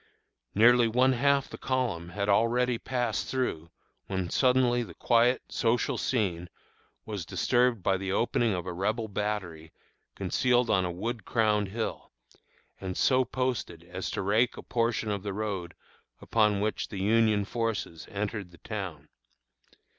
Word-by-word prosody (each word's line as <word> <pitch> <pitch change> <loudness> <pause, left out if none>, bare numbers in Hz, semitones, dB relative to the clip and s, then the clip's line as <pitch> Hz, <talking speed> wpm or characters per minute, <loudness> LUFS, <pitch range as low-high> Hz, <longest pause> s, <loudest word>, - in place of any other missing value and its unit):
Nearly 120 +3 +6
one 125 +3 +3
half 140 +2 +2
the - - -10
column 120 -10 -1
had 100 +2 -3
already 115 +3 +2
passed 120 -4 -2
through, 105 -11 -2 0.4
when 95 -3 -3
suddenly 125 -2 +3
the 115 - -7
quiet, 120 +2 +3
social 120 +1 +1
scene 90 -8 -1 0.6
was 105 -5 -4
disturbed 115 +4 +1
by 95 0 +2
the 95 0 -3
opening 115 0 +1
of 90 -1 -4
a 90 - -4
Rebel 110 +5 -1
battery 100 -6 -4 0.4
concealed 125 -2 +1
on 95 -3 +3
a 90 - -2
wood 110 +5 -4
crowned 105 -2 +1
hill, 110 +4 -4 0.7
and 95 -1 -5
so 130 -1 +4
posted 125 -10 -3
as 90 +2 -5
to 100 - -3
rake 110 +5 +2
a - - -8
portion 115 -2 0
of 100 -1 -2
the 100 0 -4
road 100 -4 -4 0.4
upon 105 -3 +2
which 110 +1 -1
the 100 - -7
Union 105 0 +3
forces 110 -7 -3
entered 100 -1 -4
the 85 - -17
town. 90 -9 -6
105 Hz, 145 wpm, -28 LUFS, 95-120 Hz, 0.7 s, Nearly